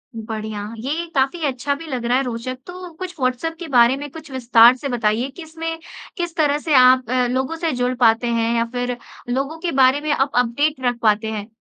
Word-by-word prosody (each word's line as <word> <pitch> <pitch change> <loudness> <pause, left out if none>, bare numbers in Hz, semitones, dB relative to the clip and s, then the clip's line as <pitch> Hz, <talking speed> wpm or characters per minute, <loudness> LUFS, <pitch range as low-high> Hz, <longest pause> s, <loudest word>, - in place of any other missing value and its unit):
बढ़िया। 220 -1 -5 0.2
ये 290 +9 -3
काफ़ी 275 +5 +1
अच्छा 275 +1 -1
भी 320 +3 -10
लग 250 -4 -4
रहा 245 +2 +2
है 270 - +1
रोचक। 250 +1 -4
तो 360 0 -8
कुछ 370 -1 -5
व्हाट्सऐप 255 +6 -1
के 345 - -6
बारे 240 +2 +5
में 290 +1 -6
कुछ 315 -3 -11
विस्तार 240 -1 +6
से 275 +2 -5
बताइए 235 +1 0
कि 335 +5 -10
इसमें, 325 +1 -5 0.4
किस 345 -2 -3
तरह 295 -3 +2
से 310 -1 -2
आप 255 -1 +5
अ, 250 0 +2
लोगों 260 +5 -1
से 325 -1 -1
जुड़ 250 0 -1
पाते 230 0 +3
हैं 230 0 0
या 230 0 +1
फ़िर 245 0 -2 0.3
लोगों 275 +6 -2
के 340 0 -2
बारे 260 +3 +4
में 305 0 -1
आप 275 0 +1
अपडेट 285 +5 -1
रख 245 -1 +1
पाते 220 0 +2
हैं? 210 0 -5
255 Hz, 215 wpm, -20 LUFS, 235-305 Hz, 0.4 s, विस्तार